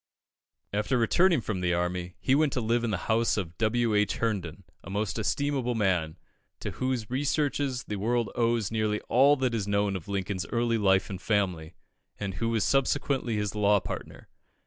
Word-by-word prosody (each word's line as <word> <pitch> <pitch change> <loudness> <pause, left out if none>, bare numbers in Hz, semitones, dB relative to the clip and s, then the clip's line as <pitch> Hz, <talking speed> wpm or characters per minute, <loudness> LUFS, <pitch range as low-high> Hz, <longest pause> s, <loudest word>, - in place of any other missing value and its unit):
After 105 +4 +1
returning 165 +6 +3
from 105 -4 -3
the 90 -1 +1
army, 90 0 -2
he 130 - +1
went 150 0 +3
to - - 0
live 115 +1 +1
in 120 - 0
the 95 -3 -3
house 115 +1 +2
of 85 -4 -3
W. 115 0 +1
H. 105 -1 +2
Herndon, 100 -6 -2 0.2
a - - -10
most 105 +2 -2
estimable 130 +1 0
man, 90 -7 0 0.4
to - - -4
whose 125 -4 -2
researches 140 -1 0
the 105 - -5
world 115 +3 0
owes 115 -3 +1
nearly 110 -1 0
all 135 +5 +5
that 130 -3 -1
is 105 -3 -2
known 100 -1 +1
of 90 -4 -6
Lincoln's 95 -3 -3
early 115 -1 0
life 95 -1 +2
and 95 -1 -6
family, 90 -6 -1 0.4
and 100 -2 -3
who 115 +5 -2
was 115 -3 +1
subsequently 135 -3 +1
his 105 -1 -1
law 105 -1 +3
partner. - - -7
110 Hz, 180 wpm, -28 LUFS, 100-120 Hz, 0.4 s, all